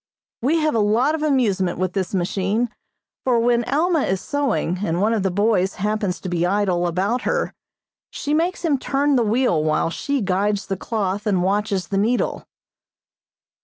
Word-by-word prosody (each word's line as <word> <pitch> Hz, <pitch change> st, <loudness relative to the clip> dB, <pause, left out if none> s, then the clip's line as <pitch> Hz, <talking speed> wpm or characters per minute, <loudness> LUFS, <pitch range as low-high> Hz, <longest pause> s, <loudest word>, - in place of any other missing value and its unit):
We 285 Hz, +8 st, +2 dB
have 310 Hz, -1 st, +1 dB
a 230 Hz, -, +1 dB
lot 225 Hz, +8 st, +2 dB
of 320 Hz, -, -2 dB
amusement 215 Hz, -, +1 dB
with 185 Hz, 0 st, -1 dB
this 195 Hz, -1 st, -2 dB
machine, 200 Hz, +5 st, 0 dB, 0.5 s
for 245 Hz, -3 st, +2 dB
when 240 Hz, 0 st, +2 dB
Alma 320 Hz, +3 st, +1 dB
is 190 Hz, -5 st, 0 dB
sewing 260 Hz, -, -1 dB
and 170 Hz, -3 st, 0 dB
one 215 Hz, +4 st, +2 dB
of 220 Hz, -, 0 dB
the 190 Hz, -, +1 dB
boys 195 Hz, 0 st, +1 dB
happens 210 Hz, -2 st, -1 dB
to -, -, -5 dB
be 175 Hz, -1 st, -1 dB
idle 180 Hz, -2 st, +1 dB
about 195 Hz, +8 st, 0 dB
her -, -, -1 dB, 0.6 s
she 295 Hz, -, -3 dB
makes 340 Hz, +3 st, 0 dB
him 290 Hz, -5 st, +2 dB
turn 280 Hz, +2 st, +1 dB
the 250 Hz, -, +3 dB
wheel 225 Hz, -7 st, +2 dB
while 155 Hz, +1 st, +1 dB
she 280 Hz, +10 st, -2 dB
guides 200 Hz, 0 st, 0 dB
the 195 Hz, -, -2 dB
cloth 205 Hz, 0 st, -2 dB
and 190 Hz, -4 st, +2 dB
watches 195 Hz, -1 st, 0 dB
the 195 Hz, -, 0 dB
needle. 230 Hz, +5 st, 0 dB
210 Hz, 175 wpm, -21 LUFS, 185-250 Hz, 0.6 s, the